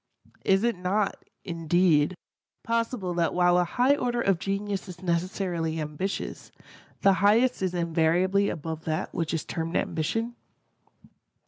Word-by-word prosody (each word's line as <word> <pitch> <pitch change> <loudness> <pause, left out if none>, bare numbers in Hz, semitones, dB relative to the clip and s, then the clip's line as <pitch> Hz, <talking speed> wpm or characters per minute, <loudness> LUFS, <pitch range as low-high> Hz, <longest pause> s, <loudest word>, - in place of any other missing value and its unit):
Is 195 +2 +3
it 235 -1 +2
not, 195 +3 -1 0.2
indeed, 170 -1 +2 0.5
possible 230 -5 -1
that 170 -1 0
while 175 0 +4
a - - +4
high 250 +10 +2
order 245 -3 -1
of 195 -6 +2
genius 195 +1 -3
is 180 +1 -10
necessarily 170 -2 -1
ambitious, 155 +6 -4 0.5
the 195 - +5
highest 230 +5 +4
is 185 -1 -1
invariably 175 +4 +2
above 160 0 -5
that 155 -1 -2
which 165 -2 -2
is 165 - -2
termed 165 +1 -4
ambition? 225 +10 -1
180 Hz, 130 wpm, -27 LUFS, 165-200 Hz, 0.5 s, the